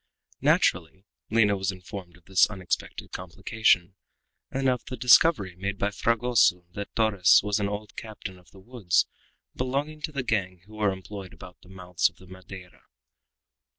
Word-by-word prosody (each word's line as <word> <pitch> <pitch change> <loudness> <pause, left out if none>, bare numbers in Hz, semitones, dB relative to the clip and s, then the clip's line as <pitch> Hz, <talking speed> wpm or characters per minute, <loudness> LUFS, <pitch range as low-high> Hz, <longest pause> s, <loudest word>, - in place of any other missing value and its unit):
Naturally, 95 +2 +1 0.2
Lina 105 -2 +3
was 95 +1 -1
informed 90 -1 -9
of 90 - -26
this 95 -1 +4
unexpected 95 -4 -4
complication, 90 0 0 0.6
and 135 0 -1
of 125 -2 +1
the 130 - -6
discovery 125 - +5
made 100 +2 -4
by 100 +1 0
Fragoso 110 -5 +2
that 100 +2 -7
Torres 100 -6 +5
was 105 +1 0
an 100 -1 0
old 105 +1 -6
captain 105 -4 -8
of 90 - -22
the 95 - -16
woods 100 -5 +1 0.5
belonging 140 +4 -2
to 155 - -4
the 140 -3 -3
gang 95 -7 -1
who 105 - -17
were 105 -2 +1
employed 95 0 -8
about 90 -1 -13
the 90 - -18
mouths 90 -2 0
of - - -28
the 95 - -17
Madeira. 95 0 -12
100 Hz, 160 wpm, -26 LUFS, 90-115 Hz, 0.6 s, discovery